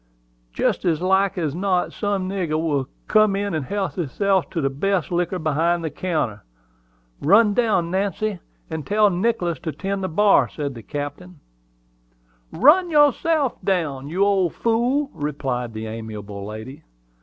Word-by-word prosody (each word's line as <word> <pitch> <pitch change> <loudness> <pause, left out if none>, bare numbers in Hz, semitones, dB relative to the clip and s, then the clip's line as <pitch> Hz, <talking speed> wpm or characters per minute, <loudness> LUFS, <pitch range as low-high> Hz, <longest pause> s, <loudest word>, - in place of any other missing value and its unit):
Jest - - 0
as 165 -4 +1
like 190 +2 +2
as 155 -5 -1
not 185 +1 0
some 200 -3 -1
nigger 180 -5 -1
will 145 -5 0 0.2
come 215 -2 +4
in 200 -1 -2
and 155 -3 -1
help 200 +5 -2
hisself 190 +4 0
to 170 - -3
the 135 -3 0
best 185 +5 -1
liquor 175 +1 0
behind 165 +2 0
the 160 - -3
counter. 155 - -2 0.8
Run 205 +7 +5
down, 200 -8 +1
Nancy, 200 +1 -1 0.3
and 160 -2 -5
tell 210 0 +4
Nicholas 180 -3 0
to 160 - -4
tend 195 +4 -3
to 190 - -1
the 165 - -9
bar," 205 0 +4
said 145 -3 -4
the 115 - -9
captain. 145 - -6 1.1
"Run 310 - +5
down - - -9
yourself, 295 -1 +3
you 160 -2 0
old 190 -4 +1
fool!" 245 +5 +1
replied 135 -5 -3
the 110 0 -5
amiable 105 -3 -7
lady. 110 +6 -8
180 Hz, 155 wpm, -22 LUFS, 145-200 Hz, 1.1 s, Run